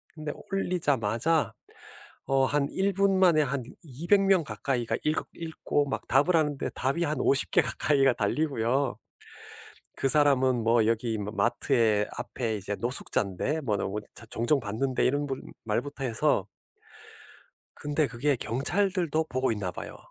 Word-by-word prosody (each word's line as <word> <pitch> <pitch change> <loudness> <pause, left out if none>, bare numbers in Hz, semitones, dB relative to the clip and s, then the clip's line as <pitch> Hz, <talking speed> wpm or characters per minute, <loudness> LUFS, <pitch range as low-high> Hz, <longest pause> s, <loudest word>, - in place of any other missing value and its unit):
근데 155 -2 -5 0.2
올리자마자 155 - 0 0.7
어 135 -1 +3
한 140 +1 +1
1 195 +1 0
분 195 0 +2
만에 175 -5 +5
한 140 -1 -2 0.2
200 170 +8 +1
명 195 -3 +3
가까이가 130 -5 -2
읽었 155 +1 0
읽고 160 -3 -2
막 135 - -4
답을 145 +7 +3
하는데 150 -3 0
답이 135 +7 0
한 150 -1 -1
50 140 - +3
개 - - +5
가까이가 135 -3 +2
달리고요. 125 +1 0 1.0
"그 135 - +1
사람은 130 -4 +4
뭐 115 -1 +4
여기 115 0 0
마 105 0 -4
마트에 105 0 +2
앞에 115 -4 -3
이제 100 +1 -4
노숙자인데 120 - 0
뭐 110 -8 -1
너 - - -2
보 105 +2 -3 0.3
종종 120 +7 +1
봤는데." 120 +4 -1
이런 145 +3 0
분 135 -1 -4 0.2
말부터 130 +6 -3
해서. 115 -3 +1 1.3
근데 145 +1 0
그게 140 +4 0
경찰들도 160 - 0
보고 130 -1 0
있나 100 -4 -2
봐요. - - -8
135 Hz, 270 characters per minute, -27 LUFS, 115-155 Hz, 1.3 s, 만에